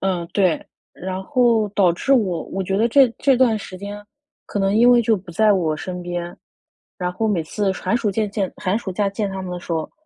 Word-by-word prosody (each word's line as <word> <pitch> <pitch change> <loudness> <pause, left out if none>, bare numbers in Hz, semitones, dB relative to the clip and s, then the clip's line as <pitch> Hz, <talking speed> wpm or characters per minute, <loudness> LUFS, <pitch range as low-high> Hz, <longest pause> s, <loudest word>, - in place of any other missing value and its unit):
嗯， 180 -3 -1
对， 185 -5 +1 0.3
然 185 +1 -5
后 235 -2 +2
导 190 -4 +3
致 270 +10 0
我 190 -10 +2
我 195 0 -4
觉 195 +1 -1
得 230 +3 +2
这 270 +1 +6
这 270 -3 +3
段 235 -4 +3
时 185 -2 -9
间 205 +1 -7 0.4
可 205 - -4
能 195 +1 +1
因 240 +2 +6
为 245 - +6
就 225 -2 +2
不 185 -1 -11
在 215 +2 +4
我 160 -5 0
身 180 +2 -6
边， 175 0 -5 0.6
然 180 -1 -2
后 220 +5 -1
每 180 -6 0
次 195 +4 -1
寒 230 +4 -1
暑 215 -4 0
见 210 0 -1
见， 200 -2 -2
寒 190 +4 -1
暑 190 -5 -6
假 200 +1 0
见 200 0 -3
他 190 0 -5
们 185 - -6
的 180 - -4
时 175 - -6
候， 160 -1 -2
195 Hz, 250 characters per minute, -21 LUFS, 180-220 Hz, 0.6 s, 这